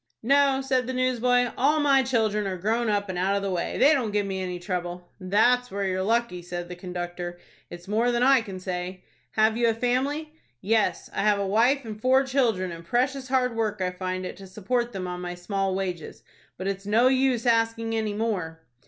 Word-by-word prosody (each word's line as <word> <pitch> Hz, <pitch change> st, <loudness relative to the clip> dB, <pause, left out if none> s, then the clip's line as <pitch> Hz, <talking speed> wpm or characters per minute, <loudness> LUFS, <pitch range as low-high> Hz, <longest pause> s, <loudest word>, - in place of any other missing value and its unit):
"No," 275 Hz, +1 st, +3 dB
said 260 Hz, -2 st, 0 dB
the 260 Hz, -, -3 dB
newsboy, 245 Hz, -1 st, +2 dB
"all 295 Hz, +4 st, +2 dB
my 280 Hz, -2 st, +4 dB
children 220 Hz, -5 st, 0 dB
are 185 Hz, -1 st, -3 dB
grown 225 Hz, +5 st, 0 dB
up 205 Hz, -1 st, 0 dB
and 185 Hz, -2 st, -4 dB
out 195 Hz, +2 st, +1 dB
of 200 Hz, -, -1 dB
the 195 Hz, -, -1 dB
way. 175 Hz, -2 st, -2 dB
They 295 Hz, -, +6 dB
don't 255 Hz, -7 st, 0 dB
give 205 Hz, -1 st, 0 dB
me 190 Hz, -1 st, -3 dB
any 180 Hz, -1 st, -3 dB
trouble." 175 Hz, 0 st, -5 dB
"That's 240 Hz, +7 st, +2 dB
where 200 Hz, +1 st, -3 dB
you're 185 Hz, 0 st, -1 dB
lucky," 225 Hz, -2 st, 0 dB
said 175 Hz, 0 st, -6 dB
the 180 Hz, -, -6 dB
conductor. 175 Hz, -1 st, -6 dB, 0.3 s
"It's 175 Hz, +1 st, -10 dB
more 225 Hz, +4 st, +1 dB
than 240 Hz, 0 st, +1 dB
I 265 Hz, -1 st, +5 dB
can 195 Hz, -4 st, -7 dB
say." 180 Hz, 0 st, -5 dB, 0.3 s
"Have 220 Hz, +1 st, +3 dB
you 235 Hz, 0 st, +3 dB
a 225 Hz, -, 0 dB
family?" 275 Hz, +6 st, -1 dB, 0.3 s
"Yes, 205 Hz, -, 0 dB
I -, -, -1 dB
have 210 Hz, 0 st, +3 dB
a 200 Hz, -, -1 dB
wife 240 Hz, +7 st, +2 dB
and 215 Hz, -1 st, -7 dB
four 260 Hz, +2 st, +4 dB
children, 235 Hz, -9 st, 0 dB
and 165 Hz, 0 st, -8 dB
precious 260 Hz, +8 st, 0 dB
hard 250 Hz, -2 st, +1 dB
work 215 Hz, -2 st, -1 dB
I 185 Hz, -1 st, -1 dB
find 185 Hz, 0 st, -4 dB
it -, -, -6 dB
to 195 Hz, -, -11 dB
support 235 Hz, +5 st, -2 dB
them 190 Hz, -4 st, -5 dB
on 180 Hz, 0 st, -5 dB
my 175 Hz, 0 st, -5 dB
small 195 Hz, +1 st, -2 dB
wages. 180 Hz, -4 st, -5 dB, 0.3 s
But 185 Hz, -, -6 dB
it's 195 Hz, 0 st, -3 dB
no 225 Hz, +4 st, +4 dB
use 260 Hz, -2 st, +2 dB
asking 225 Hz, -1 st, +1 dB
any 220 Hz, -2 st, -1 dB
more." 180 Hz, -8 st, -3 dB
210 Hz, 215 wpm, -26 LUFS, 185-245 Hz, 0.3 s, They